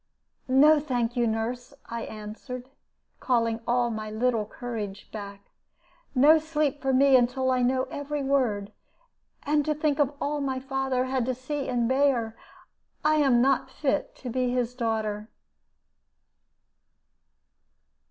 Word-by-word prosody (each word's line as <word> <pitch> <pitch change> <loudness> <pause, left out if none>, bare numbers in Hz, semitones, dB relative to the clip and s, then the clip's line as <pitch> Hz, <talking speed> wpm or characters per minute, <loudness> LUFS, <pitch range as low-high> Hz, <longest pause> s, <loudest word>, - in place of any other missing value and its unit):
"No, 295 +4 +6
thank 245 -5 -1
you, 240 -1 +2
nurse," 240 +4 -3
I 235 0 -5
answered, 235 +4 -8 0.5
calling 230 -3 +1
all 240 0 +2
my 215 -1 -4
little 220 -1 0
courage 215 -5 -6
back. 200 -2 -9 0.6
"No 300 +5 +7
sleep 300 -2 -1
for 270 - +1
me 270 +1 +5
until 260 +1 +2
I 255 -1 +2
know 255 +1 +2
every 285 0 -3
word. 235 -7 0 0.7
And 295 0 +2
to 305 +1 0
think 300 -1 0
of 290 0 +2
all 295 0 -1
my 265 -2 -1
father 265 -1 -1
had 260 -2 -1
to 255 - 0
see 275 +2 -4
and 240 -2 +1
bear! 260 -4 +1 0.7
I 310 0 +4
am 265 -5 +4
not 270 -1 +2
fit 290 0 -2
to 250 - -7
be 250 +1 0
his 245 -1 -1
daughter." 220 -3 -2
255 Hz, 135 wpm, -27 LUFS, 230-275 Hz, 0.7 s, No